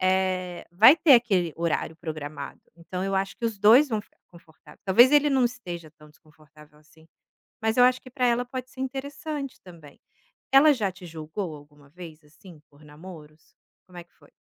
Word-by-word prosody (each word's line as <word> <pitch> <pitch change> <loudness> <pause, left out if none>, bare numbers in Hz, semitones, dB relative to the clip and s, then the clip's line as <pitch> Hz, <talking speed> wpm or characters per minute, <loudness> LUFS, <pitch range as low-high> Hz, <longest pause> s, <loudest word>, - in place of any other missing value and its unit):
eh, 185 -1 -1
vai 220 - +7
ter 300 -4 +6
aquele 195 -9 +1
horário 165 -1 -2
programado, 150 -3 -8 0.2
então 180 +2 -7
eu 195 0 -2
acho 195 0 -2
que - - -8
os 225 -3 -2
2 230 +9 +6
vão 220 -4 -2
ficar - - -25
confortável. 165 -2 -19
Talvez 235 +7 +6
ele 295 0 +4
não 265 -2 +2
esteja 175 -10 -6
tão 150 -1 -19
desconfortável 150 -1 -22
assim, 160 +1 -23 0.6
mas 220 +1 -1
eu 245 - +6
acho 255 0 +3
que 255 - -14
para 255 -1 -1
ela 245 0 +1
pode 255 0 -7
ser 255 - -17
interessante 275 +2 -6
também. 165 -6 -16 0.5
Ela 290 +2 +6
já 210 -7 -2
te 180 0 -14
julgou 160 +1 -7
alguma 145 -1 -18
vez, 165 -1 -13
assim, 155 +2 -17
por 145 +1 -22
namoros? 155 0 -15 0.3
Como 180 - -15
é 175 - -8
que 170 - -40
foi? - - -24
185 Hz, 185 wpm, -25 LUFS, 155-245 Hz, 0.6 s, vai